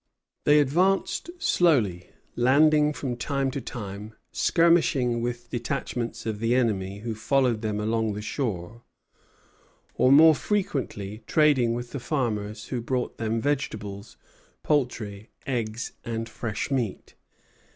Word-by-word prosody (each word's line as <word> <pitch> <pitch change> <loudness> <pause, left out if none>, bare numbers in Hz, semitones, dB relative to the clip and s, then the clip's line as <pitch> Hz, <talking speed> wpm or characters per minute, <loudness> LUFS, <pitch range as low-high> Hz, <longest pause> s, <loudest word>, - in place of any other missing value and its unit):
They 150 0 +6
advanced 180 - +1
slowly, 120 - +2 0.3
landing 150 +4 +4
from 135 -4 -4
time 135 +1 -1
to 135 - -4
time, 105 -2 -7 0.2
skirmishing 160 -8 +3
with 120 0 -4
detachments 120 -2 -3
of 110 -2 -3
the 115 +2 +1
enemy 100 -5 0
who 115 0 -3
followed 125 0 +1
them 105 -2 -2
along 110 0 0
the 105 - -5
shore, 110 -3 -4 1.1
or 130 - +3
more 160 +3 +8
frequently 135 - -2
trading 135 -7 +3
with 120 0 -6
the 140 - -4
farmers 110 -6 -2
who 125 -2 -2
brought 125 +1 -2
them 115 0 -1
vegetables, 110 -7 -3 0.5
poultry, 115 -7 -1 0.2
eggs, 115 -3 -3
and 115 -1 -3
fresh 115 +1 -4
meat. 120 -7 -2
120 Hz, 120 wpm, -26 LUFS, 110-140 Hz, 1.1 s, more